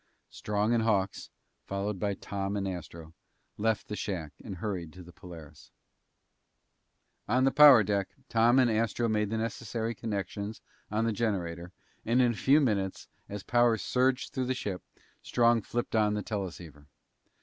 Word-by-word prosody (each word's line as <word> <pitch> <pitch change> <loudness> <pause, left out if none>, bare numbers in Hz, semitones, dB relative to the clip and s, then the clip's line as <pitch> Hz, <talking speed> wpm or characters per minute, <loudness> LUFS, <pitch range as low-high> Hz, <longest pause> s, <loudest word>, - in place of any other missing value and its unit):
Strong 105 +2 -1
and 115 - +2
Hawks, 100 -4 0 0.4
followed 100 0 -3
by 100 0 -1
Tom 100 +1 -4
and 100 -1 -2
Astro, 85 -3 -7 0.4
left 110 0 -1
the 105 - -4
shack 85 -8 -4
and 95 - -6
hurried 90 -4 -4
to 90 - -11
the 90 - -13
Polaris. 80 -5 -12 1.6
On 125 +4 +2
the 135 - +4
power 140 -7 +8
deck, 100 -1 -1 0.2
Tom 115 +1 +4
and 125 -3 +4
Astro 115 +1 0
made 105 -2 0
the 110 - -2
necessary 115 0 -3
connections 105 -1 -4 0.3
on 110 +2 0
the 115 - 0
generator, 90 -6 -2 0.3
and 115 +3 +2
in 125 -2 +4
a - - -5
few 140 +7 +4
minutes, 100 -9 -1 0.2
as 100 -1 -6
power 120 -2 +3
surged 130 +5 0
through 130 - -1
the 130 - 0
ship, 100 -7 -4 0.4
Strong 120 -1 +3
flipped 120 +3 -3
on 105 -1 +3
the 105 - -3
teleceiver. 85 -8 -6
105 Hz, 160 wpm, -29 LUFS, 95-115 Hz, 1.6 s, power